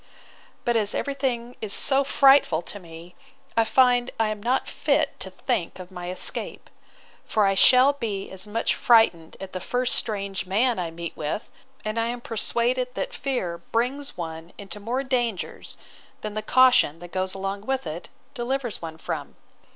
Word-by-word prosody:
But 240 - +2
as 210 -2 +2
every 280 - -1
thing 245 -3 -2
is 210 -2 -2
so 275 0 +4
frightful 270 - +5
to 205 - -8
me, 170 0 -12 0.4
I 230 - +4
find 245 +2 +3
I 220 -1 +2
am 215 -1 -4
not 250 +4 0
fit - - 0
to - - -4
think 225 -10 -2
of 185 0 -10
my 180 -1 -6
escape: 185 - -2 0.5
for 215 -2 +1
I 195 - +3
shall 255 +7 +6
be 215 -8 -4
as 190 +1 -3
much 225 +2 0
frightened 200 -9 +3
at 190 -1 -8
the 185 - -3
first 250 +6 0
strange 200 -3 -2
man 230 +6 +2
that - - -1
I - - -6
meet 170 +1 -7
with: 155 +8 -4 0.3
and 215 +2 -1
I 230 - +1
am 240 +1 -3
persuaded 240 +2 0
that - - -3
fear 215 -11 -2
brings 250 +10 -2
one 165 0 -6
into 200 0 -7
more 240 +6 -2
dangers, 240 -7 -2 0.4
than 215 -1 -5
the 215 - -2
caution, 250 - +5
that 175 +1 -11
goes 185 +2 -2
along 195 +2 -4
with 265 -4 -1
it, 160 +2 -6 0.2
delivers 250 -2 -3
one 160 -1 -7
from. - - -5
215 Hz, 175 wpm, -25 LUFS, 185-250 Hz, 0.5 s, shall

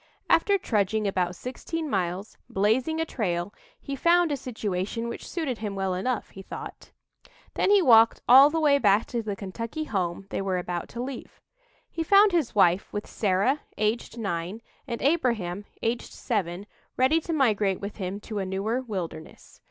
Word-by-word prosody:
After 405 -1 +4
trudging 215 - 0
about 180 -2 -1
sixteen 315 - -5
miles, 190 -3 -2
blazing 240 +11 +1
a 325 - +1
trail, 185 - -2 0.3
he 275 - -5
found 340 +3 +3
a - - +1
situation 220 -3 -3
which 235 - -7
suited 295 -9 -3
him 210 -2 -4
well 190 -1 -1
enough, 220 +6 -2
he 195 - -10
thought. - - -9 0.6
Then - - +1
he 405 -2 +5
walked 230 -4 +6
all 270 +4 +9
the 325 +2 -1
way 290 -2 +4
back 205 -2 +4
to 235 - -2
the 210 -2 -4
Kentucky 230 +9 -5
home 190 - -2
they - - -2
were 190 -1 -1
about 175 -1 -4
to 240 +1 -5
leave. 260 -1 -8 0.5
He 330 - -5
found 400 +5 +6
his 330 -11 0
wife, 180 -1 +3
with 205 - -4
Sarah, 205 +8 +1 0.2
aged 215 +2 -1
nine, 195 0 -3 0.2
and 235 -2 -4
Abraham, 230 - 0 0.2
aged 235 +1 -2
seven, 195 -5 -2 0.3
ready 285 +6 +3
to 335 - -5
migrate 215 - +2
with 200 +1 -6
him 195 0 -4
to 215 -1 -5
a - - -1
newer 205 +6 -1
wilderness. 185 -9 -7
220 Hz, 170 wpm, -26 LUFS, 195-265 Hz, 0.6 s, all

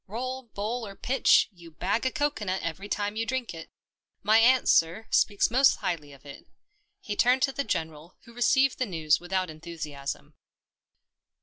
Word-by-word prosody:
" - - -57
Roll, 255 +1 -4
bowl, 230 0 -4
or 195 - -10
pitch, 260 +4 +3
you 170 -3 -15
bag 195 +10 -1
a - - -1
coco 290 -6 -1
nut 190 0 -2
every 185 +5 -5
time 205 0 -2
you 225 - -1
drink 255 -1 -3
it. 165 -1 -10 0.5
My 215 +2 +5
aunt, 250 +2 +4
sir, 165 +7 +3
speaks 205 +1 +2
most 265 +3 +5
highly 150 -5 -4
of 140 0 -17
it." 140 - -12 0.5
He 210 - -5
turned 250 +4 +3
to 270 - +2
the 280 - -3
General, 160 - -4
who 235 - -16
received 265 +3 +2
the 255 - 0
news 160 -4 +1
without 185 0 -2
enthusiasm. 155 -3 -7
205 Hz, 180 wpm, -27 LUFS, 165-245 Hz, 0.5 s, My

